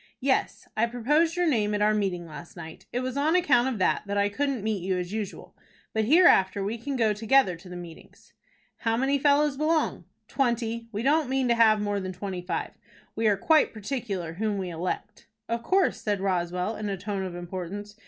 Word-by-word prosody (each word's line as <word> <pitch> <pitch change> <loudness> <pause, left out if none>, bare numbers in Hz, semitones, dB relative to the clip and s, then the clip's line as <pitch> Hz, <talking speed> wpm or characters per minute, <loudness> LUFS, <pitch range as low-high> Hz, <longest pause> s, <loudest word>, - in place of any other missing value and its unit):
"Yes; 265 0 0
I 225 +2 +2
proposed 295 +8 +1
your 355 0 +1
name 210 -7 +1
at 205 - -1
our 215 0 +4
meeting 190 -5 -1
last 165 +1 -11
night. 160 0 -10
It 245 - -1
was 255 0 -3
on 305 +4 +2
account 290 -9 +4
of 260 -4 -2
that, 185 - +2
that 200 0 -2
I 200 0 +2
couldn't 270 0 -2
meet 215 -3 -1
you 185 +1 -1
as 180 +2 -4
usual. 215 -3 -6 0.4
But 220 -1 +1
hereafter 205 - +5
we 220 +4 -3
can 275 +4 -4
go 225 -4 +2
together 220 -2 +3
to 180 +2 -14
the 180 - -8
meetings." 175 -2 -12 0.4
"How 225 -1 0
many 275 +3 +1
fellows 290 0 +3
belong?" 310 +2 0 0.2
"Twenty. 235 -3 -1
We 215 +1 -3
don't 295 0 +2
mean 265 -1 +1
to - - +5
have 220 -2 +5
more 205 -1 -1
than 185 -1 -5
twenty 185 0 -5
five. 175 -2 -3 0.4
We 225 0 +1
are 205 -2 +3
quite 310 +8 +3
particular 205 -7 -4
whom 210 +3 -1
we 185 -2 -3
elect." 180 +5 -5 0.2
"Of 230 0 -2
course," 380 +10 +1
said 205 -2 -1
Roswell, 180 +1 -1
in 215 -1 -3
a 195 - -2
tone 200 +1 -4
of 185 -2 -5
importance. 185 +4 -6
215 Hz, 205 wpm, -27 LUFS, 190-260 Hz, 0.4 s, hereafter